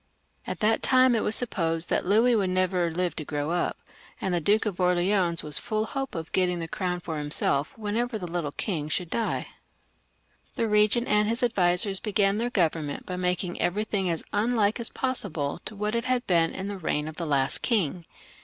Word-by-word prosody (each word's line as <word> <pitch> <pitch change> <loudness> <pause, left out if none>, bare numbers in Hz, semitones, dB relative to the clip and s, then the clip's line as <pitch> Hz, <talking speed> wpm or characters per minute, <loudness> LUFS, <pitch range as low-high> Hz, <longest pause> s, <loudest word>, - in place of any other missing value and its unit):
At - - -5
that 220 +1 +3
time 255 -1 +5
it 225 - +2
was 215 - +1
supposed 165 -8 -1
that - - 0
Louis 230 +5 +4
would 195 -4 +1
never 185 -1 +1
live 175 +2 -1
to 155 - -2
grow 145 +1 -3
up, 175 - 0 0.4
and 190 - -1
the 175 - +1
Duke 210 +7 +2
of 200 -4 -3
Orleans 180 -1 +2
was 150 -1 -1
full 215 0 -1
of 220 - -6
hopes 270 -4 -3
of 165 -1 -5
getting 180 -1 +1
the 165 - -4
crown 180 +1 -2
for 160 -3 -4
himself 145 +1 0
whenever 225 +2 -1
the 185 - -6
little 170 -4 -3
king 155 -4 -3
should 175 +2 -1
die. 230 - -1 1.1
The 230 - 0
regent 210 +3 +3
and 210 0 +3
his 230 +2 0
advisers 195 -3 +2
began 205 -1 +1
their 240 +1 0
government 160 -8 -1
by 180 - -4
making 180 0 -1
everything 200 0 0
as 165 -2 -1
unlike 215 0 +2
as 235 - -2
possible 175 - -2
to 215 - -4
what 210 +1 -2
it 235 +1 -1
had 255 -1 0
been 165 -3 +3
in 190 +3 -5
the 200 -1 -5
reign 150 -3 -1
of 155 - -8
the 170 - -3
last 135 -2 +1
king. 180 - 0
185 Hz, 200 wpm, -27 LUFS, 170-215 Hz, 1.1 s, time